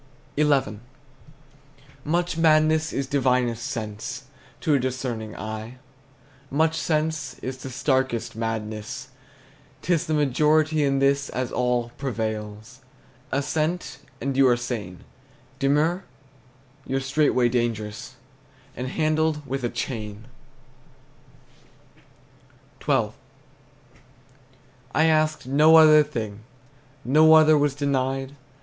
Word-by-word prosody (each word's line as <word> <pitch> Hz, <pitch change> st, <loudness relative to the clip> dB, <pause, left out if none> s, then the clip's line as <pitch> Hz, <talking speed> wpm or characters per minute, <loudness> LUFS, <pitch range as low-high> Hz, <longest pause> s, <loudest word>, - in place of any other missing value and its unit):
XI. 140 Hz, -8 st, +1 dB, 1.2 s
Much 175 Hz, +3 st, 0 dB
madness 155 Hz, -1 st, +3 dB
is 135 Hz, -, -2 dB
divinest 125 Hz, -4 st, 0 dB
sense 120 Hz, 0 st, -5 dB, 0.4 s
To 155 Hz, -, +1 dB
a 140 Hz, -, +4 dB
discerning 120 Hz, -4 st, -4 dB
eye; 110 Hz, +3 st, -6 dB, 0.7 s
Much 160 Hz, +3 st, +1 dB
sense 155 Hz, -5 st, -1 dB
the 130 Hz, 0 st, -7 dB
starkest 130 Hz, -3 st, -1 dB
madness. 110 Hz, -1 st, -4 dB, 0.7 s
'T 180 Hz, -, +1 dB
is 170 Hz, +1 st, 0 dB
the 155 Hz, -, 0 dB
majority 150 Hz, +2 st, +2 dB
In 135 Hz, -1 st, +1 dB
this, 140 Hz, 0 st, +1 dB
as 130 Hz, -1 st, -3 dB
all, 125 Hz, -1 st, 0 dB
prevails. 110 Hz, -1 st, -5 dB, 0.5 s
Assent, 155 Hz, +1 st, -2 dB, 0.2 s
and 135 Hz, 0 st, -2 dB
you 135 Hz, 0 st, +5 dB
are 120 Hz, -1 st, +3 dB
sane; 105 Hz, -7 st, -5 dB, 0.6 s
Demur, 150 Hz, +7 st, +1 dB, 0.8 s
you're 135 Hz, -, 0 dB
straightway 135 Hz, -2 st, +2 dB
dangerous, 115 Hz, 0 st, -3 dB, 0.6 s
And 125 Hz, -, -4 dB
handled 155 Hz, +1 st, 0 dB
with 135 Hz, -1 st, -4 dB
a 120 Hz, -, 0 dB
chain. 110 Hz, -5 st, -5 dB, 2.6 s
XII. -, -, +2 dB, 1.9 s
I 160 Hz, -, +4 dB
asked 155 Hz, -2 st, +1 dB
no 150 Hz, +5 st, +5 dB
other 155 Hz, -1 st, +8 dB
thing, 110 Hz, -7 st, -4 dB, 0.7 s
No 155 Hz, +5 st, +6 dB
other 155 Hz, 0 st, +6 dB
was 145 Hz, -2 st, +1 dB
denied. 135 Hz, -1 st, -1 dB
135 Hz, 100 wpm, -24 LUFS, 120-155 Hz, 2.6 s, other